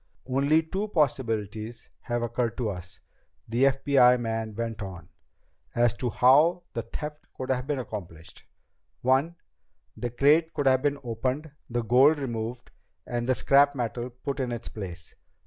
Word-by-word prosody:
"Only 140 +5 +2
two 195 +6 -3
possibilities 115 - -1
have 120 0 -2
occurred 120 0 -1
to 115 -4 -1
us," 90 -1 -9 0.5
the 120 +4 +2
FBI 135 -2 +4
man 115 -2 -3
went 115 -1 -4
on, 90 -5 -8 0.7
"as 120 0 +3
to 125 - -1
how 150 +10 +4
the 115 - -2
theft 150 +6 -7
could 130 0 -3
have 125 0 -1
been 145 -2 0
accomplished. 95 -9 -8 0.6
One: 135 +7 +2 0.6
the 120 - -3
crate 150 +7 +3
could 145 - -1
have 130 -1 +4
been 145 0 +1
opened, 130 +6 -3 0.2
the 120 0 -1
gold 130 +7 +5
removed, 120 -3 -4 0.3
and 120 0 -3
the 130 - +3
scrap 140 +2 +4
metal 120 0 -3
put 135 +3 -5
in 125 -2 -1
its 120 -1 -5
place. 90 -5 -8
125 Hz, 150 wpm, -27 LUFS, 115-140 Hz, 0.7 s, gold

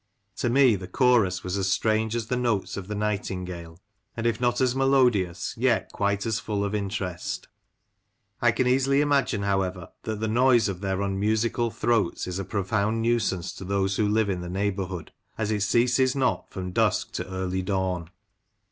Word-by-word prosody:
To 120 - 0
me 130 -2 +5
the 95 -1 -6
chorus 110 -5 +2
was 95 +2 -2
as 95 0 0
strange 110 +1 +1
as 115 -2 -2
the 125 - -1
notes 120 -5 -1
of 100 -2 -6
the 105 - -4
nightingale, 90 -5 -4 0.4
and, 115 - -3
if 115 0 0
not 120 0 +1
as 130 -1 +2
melodious, 125 -10 +2
yet 120 -1 +1
quite 100 0 0
as 110 -1 0
full 105 -3 -2
of 100 - -3
interest 100 -4 -3 0.9
I - - +5
can 130 - 0
easily 135 +2 +3
imagine, 135 -7 +1
however, 95 -3 -1
that 110 -1 -4
the 110 - -1
noise 120 +1 +4
of 95 -2 -4
their 95 0 -1
unmusical 110 +4 0
throats 110 -5 0
is 90 +1 -4
a - - -2
profound 105 +3 -1
nuisance 110 -7 0
to - - -9
those 95 0 0
who 110 - +2
live 105 -1 +2
in 90 -2 -3
the 90 - -6
neighbourhood, 95 -2 -3 0.3
as 110 -1 -1
it 105 -1 0
ceases 125 +5 +3
not 130 -2 0
from 90 -1 -5
dusk - - +1
to - - -5
early 95 0 -2
dawn." 95 -3 -2
105 Hz, 180 wpm, -26 LUFS, 95-120 Hz, 0.9 s, me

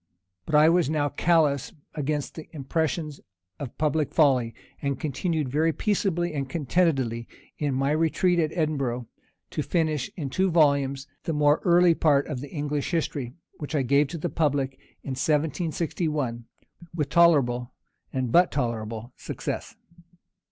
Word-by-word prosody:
But 155 - 0
I 150 +1 +7
was 170 -2 +3
now 150 -2 +1
callous 145 -3 +2 0.2
against 150 -1 -2
the 160 - -10
impressions 155 +1 -2 0.4
of 135 -5 -7
public 150 -1 0
folly, 130 -7 +3 0.3
and 140 -1 -2
continued 155 +1 -1
very 155 +5 +2
peaceably 175 -3 0
and 135 -3 -3
contentedly, 135 -6 0 0.3
in 145 -3 0
my 135 +2 +1
retreat 165 +3 +2
at 155 -2 +1
Edinburgh, 140 -7 -1 0.5
to - - -2
finish, 155 -4 0
in 140 -6 -4
two 190 +4 +2
volumes, 140 -4 +2 0.2
the 165 - -1
more 150 0 +3
early 175 -1 +5
part 145 -4 +3
of 145 -5 -4
the 145 - -7
English 145 -1 -2
history, 145 -7 -2 0.2
which 150 +1 -5
I 140 - +2
gave 140 +3 +3
to 165 - -6
the 150 - -2
public 145 -4 +1 0.3
in - - -7
1761, 150 -3 -1 0.5
with 150 -4 -1
tolerable, 135 -8 +3 0.4
and 130 -3 -2
but 175 +5 +5
tolerable, 115 -2 -3
success. - - -5
150 Hz, 145 wpm, -26 LUFS, 135-160 Hz, 0.5 s, I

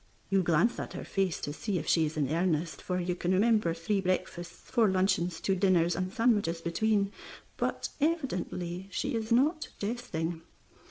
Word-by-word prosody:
You 195 -1 +4
glance 175 +7 +2
at - - -5
her - - -5
face 190 -5 0
to 145 - -3
see 195 +4 -2
if 155 - -3
she 160 -2 +3
is 155 - -6
in 145 -3 +1
earnest, 165 -1 0
for 180 0 -2
you 180 0 -1
can 175 +1 -1
remember 215 -2 +3
three 195 +4 0
breakfasts, 180 -2 -3
four 230 -5 +4
luncheons, 185 -3 +1
two 195 - +1
dinners, 180 -3 +3
and 185 0 -2
sandwiches 205 -7 +2
between; 200 +4 +1 0.4
but - - -2
evidently 190 - -1
she 270 +7 -2
is 225 0 -3
not 300 +7 +3
jesting. 175 -7 -3
185 Hz, 170 wpm, -30 LUFS, 170-215 Hz, 0.4 s, You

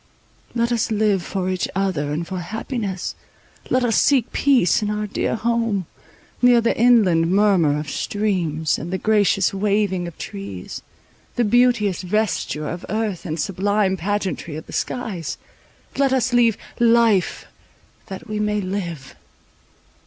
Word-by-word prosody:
Let 235 0 +1
us 235 -2 0
live 210 -3 +2
for 185 +1 -3
each 185 0 -1
other 185 -7 -1
and 160 +3 -2
for 185 -1 -4
happiness; 205 0 -4 0.6
let 255 0 +2
us 230 -2 +3
seek 265 -5 +2
peace 255 - +3
in 210 - -1
our 210 0 -2
dear 210 - -1
home, 230 -4 0 0.6
near 245 -1 +6
the 230 0 +1
inland 205 -9 +4
murmur 190 -7 +3
of 150 - -5
streams, 165 -3 -1
and 165 +5 -6
the 190 - 0
gracious 205 -2 +2
waving 195 -2 0
of 170 - -10
trees, 100 -2 -7 0.5
the 240 - +2
beauteous 230 -4 +2
vesture 185 -6 -1
of 175 +3 -5
earth, 215 -6 -2
and 160 +1 -3
sublime 195 +2 +1
pageantry 190 -3 -3
of 160 - -7
the - - -12
skies. 200 - -3 0.6
Let 275 -1 +2
us 255 -1 +1
leave 235 -3 +4 0.2
"life," 230 -5 +3 0.6
that 195 +1 -8
we 215 0 -3
may 210 0 0
live. 175 -8 -5
205 Hz, 145 wpm, -21 LUFS, 175-225 Hz, 0.6 s, near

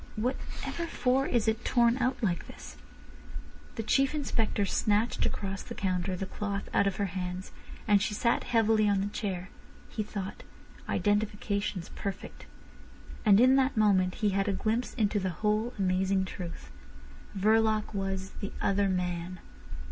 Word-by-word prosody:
"Whatever 255 +8 -3
for 265 -2 +1
is 235 -3 +1
it 220 +2 +1
torn 235 0 +3
out 250 0 0
like 175 -5 0
this?" - - -11 1.0
The 225 - -3
Chief 275 +6 +2
Inspector 225 -8 0
snatched 210 +4 +1
across 195 -1 -3
the - - -8
counter 185 -1 -1
the 195 - -3
cloth 200 +1 -4
out 200 - +3
of 195 - 0
her 200 - 0
hands, 180 0 -4 0.4
and 205 -2 +5
she 210 +1 -1
sat 235 +2 +1
heavily 220 -3 +3
on 200 -1 +2
the - - 0
chair. 185 -4 -3 0.4
He 220 - -3
thought: 205 -2 -5 0.5
identification's 205 -3 0
perfect. 200 -1 -6 0.8
And 205 -1 +7
in 255 +2 +6
that 265 -2 +2
moment 190 -4 +3
he 210 -3 +1
had 195 +1 0
a 200 - +1
glimpse 225 +5 -1
into 210 -3 +1
the 190 -1 -1 0.2
whole 215 +3 +2
amazing 190 0 +1
truth. 170 - -7 0.7
Verloc 220 +1 +2
was 195 -1 -3
the 200 - -4
"other 200 0 +2
man." 180 -1 -2
205 Hz, 150 wpm, -30 LUFS, 190-225 Hz, 1.0 s, And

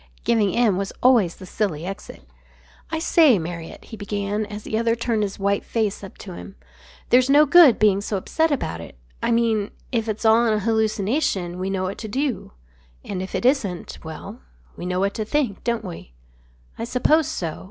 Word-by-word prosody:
Giving 215 -4 +2
in 225 -6 +2
was 195 0 -3
always 235 -9 +4
the 190 - -11
silly 180 -5 -2
exit. 190 - -8 0.7
"I 320 - -2
say, 315 -6 +5
Marriott," 170 -1 -7
he 225 - -9
began, 205 +1 -3
as 210 0 -8
the - - -4
other 230 +1 +2
turned 230 -2 -1
his 200 -2 -2
white 200 0 0
face 215 -3 -2
up 195 - -10
to 185 - -7
him. 195 +3 -10 0.5
"There's 250 +1 +4
no 295 +2 +6
good 300 -3 +7
being 200 -2 +3
so 205 0 -2
upset 320 - 0
about 170 - -2
it. 85 - -11 0.2
I - - 0
mean 225 -3 +1 0.2
if 230 -3 -1
it's 215 +1 -3
all 225 +2 +5
an 215 -1 +2
hallucination 215 - 0
we 190 +1 -2
know 190 -1 -1
what 185 +1 -4
to 220 - -5
do. 265 +3 -2 0.5
And 185 -2 -4
if 190 - -5
it - - -2
isn't 230 -10 0
well, 180 +8 -8 0.4
we 175 - -6
know 180 0 -1
what 200 +1 +1
to 220 - -3
think, 240 -3 -1
don't 235 -2 -1
we?" 165 - -9 0.7
"I - - -2
suppose 260 +6 +2
so. 165 -3 -4
210 Hz, 195 wpm, -23 LUFS, 195-235 Hz, 0.7 s, good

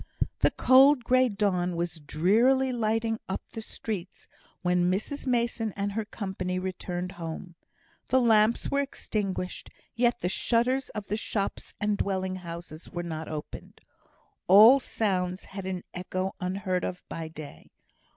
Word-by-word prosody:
The - - +5
cold 260 +1 +6
grey 255 +1 +4
dawn 185 -4 0
was 170 -1 -3
drearily 225 - +3
lighting 225 -1 0
up 190 - -3
the 225 - -6
streets 205 -4 -6 0.4
when 180 0 +2
Mrs 215 +10 -2
Mason 235 -3 0
and 200 0 -2
her 220 +1 -2
company 190 -4 -4
returned 185 -1 -4
home. 165 +2 -6 0.5
The 260 - +4
lamps 225 -1 +3
were 280 - +2
extinguished, 200 -9 -3 0.2
yet 240 +1 +1
the - - 0
shutters 245 +7 +1
of 210 -2 -4
the 210 - -2
shops 205 -2 -3
and 210 -1 0
dwelling 190 -1 -1
houses 170 -2 -8
were 175 -2 -4
not 160 -2 -5
opened. 150 -1 -7 0.7
All 220 +8 +9
sounds 185 -7 -1
had 195 -1 -7
an 185 -1 -3
echo 185 +1 -3
unheard 185 0 -1 0.2
by 165 -1 -5
day. 155 -2 -10
195 Hz, 140 wpm, -28 LUFS, 180-225 Hz, 0.7 s, All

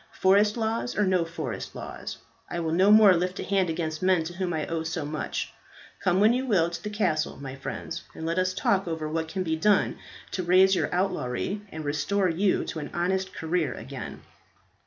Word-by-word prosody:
Forest 205 +3 +4
laws 225 +2 -1
or 210 - +3
no 185 -2 +2
forest 160 -8 -5
laws, - - -7 0.3
I 175 - -3
will 165 -1 -1
no 185 +4 +4
more 210 -2 +8
lift 180 +2 -1
a - - -2
hand 190 -3 +1
against 160 -1 -3
men 185 -3 +3
to 165 +2 -6
whom 180 0 -2
I 155 -2 -1
owe 165 -1 -2
so 160 -1 -3
much. 150 +1 -3 0.5
Come 185 0 +3
when 215 +3 +6
you 260 +2 -1
will 170 -7 +3
to 170 - -5
the 210 - -3
castle, 170 -7 0
my 135 -1 -7
friends, 165 +5 -5
and 160 - -6
let 165 +2 0
us 185 0 0
talk 195 -1 +1
over 160 -2 -3
what 160 +1 -2
can 185 +4 -2
be 160 -2 0
done 200 +5 +2 0.3
to 185 - -2
erase 185 +2 +5
your 185 - +1
outlawry 185 0 -1
and 155 -1 -6
restore 180 +7 +1
you 185 +4 +1
to 160 - -4
an 150 - -5
honest 190 +2 0
career 160 -5 -1
again." - - -8
175 Hz, 205 wpm, -27 LUFS, 160-190 Hz, 0.5 s, more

